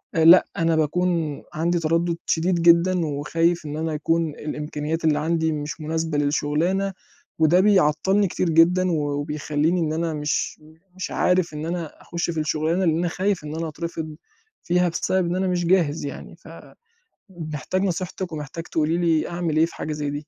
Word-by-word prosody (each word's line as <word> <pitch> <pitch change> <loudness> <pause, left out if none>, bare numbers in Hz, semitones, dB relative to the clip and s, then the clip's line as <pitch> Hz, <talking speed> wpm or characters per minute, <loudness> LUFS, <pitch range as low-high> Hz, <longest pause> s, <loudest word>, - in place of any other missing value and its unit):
آآ، 160 -1 +3
لأ، 175 +2 +8
أنا 165 -1 +2
باكون 160 -1 0
عندي 170 +2 0
تردُّد 165 +1 0
شديد 170 +1 +1
جدًا، 170 0 +4
وخايف 165 +3 0
إن 150 +1 -5
أنا 160 0 -2
يكون 165 +2 0
الإمكانيات 150 +2 -4
اللي 150 -1 +3
عندي 160 0 0
مش 150 +1 -5
مناسبة 160 0 -2
للشغلانة. 165 +7 0 0.5
وده 160 +3 +5
بيعطِّلني 190 +1 +3
كتير 175 0 -1
جدًا، 175 +3 +4
و - - +1
وبيخلِّيني 150 +3 -1
إن 155 -1 0
أنا 165 0 -1
مش 150 0 -2 0.3
مش 185 - -5
عارف 180 -3 +1
إن 150 +1 -4
أنا 170 -3 -5
أخُش 170 0 -3
في 160 - -3
الشغلانة، 160 +4 0
لأن 160 -1 +2
أنا 175 +1 0
خايف 190 -1 -1
إن 150 +1 -6
أنا 165 0 -3
أترفض 160 0 -6 0.5
فيها 180 0 +2
بسبب 180 +1 0
إن 175 - -1
أنا 190 0 0
مش 175 -1 0
جاهز 165 -5 +2
يعني. 140 - -8 0.7
فمحتاج 175 - -5
نصيحتِك، 185 -1 -3
ومحتاج 155 +2 -6
تقولي 160 +2 0
لي 165 -2 +1
أعمل 170 -3 -2
إيه 160 - +5
في - - -10
حاجة 155 - -4
زي 150 -1 -3
دي. 145 +1 -6
165 Hz, 170 wpm, -23 LUFS, 150-175 Hz, 0.7 s, لأ